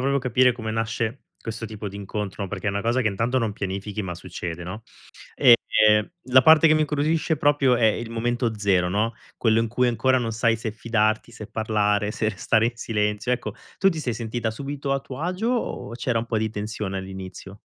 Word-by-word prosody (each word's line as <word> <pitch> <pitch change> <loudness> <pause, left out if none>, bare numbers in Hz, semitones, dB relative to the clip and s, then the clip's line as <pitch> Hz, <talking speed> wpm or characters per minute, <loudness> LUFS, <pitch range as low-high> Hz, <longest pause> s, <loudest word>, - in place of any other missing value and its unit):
proprio 140 +2 +1
capire, 130 -1 +3
come 110 -2 -5
nasce 115 +2 -2 0.2
questo 115 0 -5
tipo 110 -1 -6
di 100 - -12
incontro, 100 0 -5
no, 100 - -4
perché 100 0 -5
è - - +3
una 100 0 -2
cosa 120 +3 +1
che 110 - +2
intanto 115 +6 0
non 115 -4 -1
pianifichi, 100 +1 -4
ma 90 -3 -4
succede, 85 -2 -6
no, 95 +6 -7 0.5
ehm, 120 -2 +8 0.8
la 130 +1 +8
parte 160 +3 +7
che 155 - +5
mi 155 - +3
incuriosisce 155 +2 +1
proprio 145 -3 +3
è 115 - 0
il 110 +1 0
momento 115 0 -1
zero, 95 -3 +2
no, 105 +5 0 0.2
quello 110 -1 +3
in 115 - +1
cui 125 +3 +1
ancora 125 +3 +2
non 115 -3 -2
sai 115 +1 +2
se 110 -1 -4
fidarti, 110 0 0
se 110 -3 -9
parlare, 105 -1 0
se 110 0 -1
restare 110 0 +1
in 120 - -5
silenzio. 105 0 -1
Ecco, 125 - -4 0.2
tu 195 - +4
ti 165 -4 -3
sei 125 -6 -2
sentita 110 0 -3
subito 140 +3 -3
a 135 - 0
tuo 135 0 -8
agio, 185 +7 -1
o 245 - -2
c'era 120 0 -1
un 115 - -4
po' 115 - -1
di 110 0 0
tensione 105 -2 -4
all'inizio? 95 +1 -8
115 Hz, 210 wpm, -24 LUFS, 105-125 Hz, 0.8 s, ehm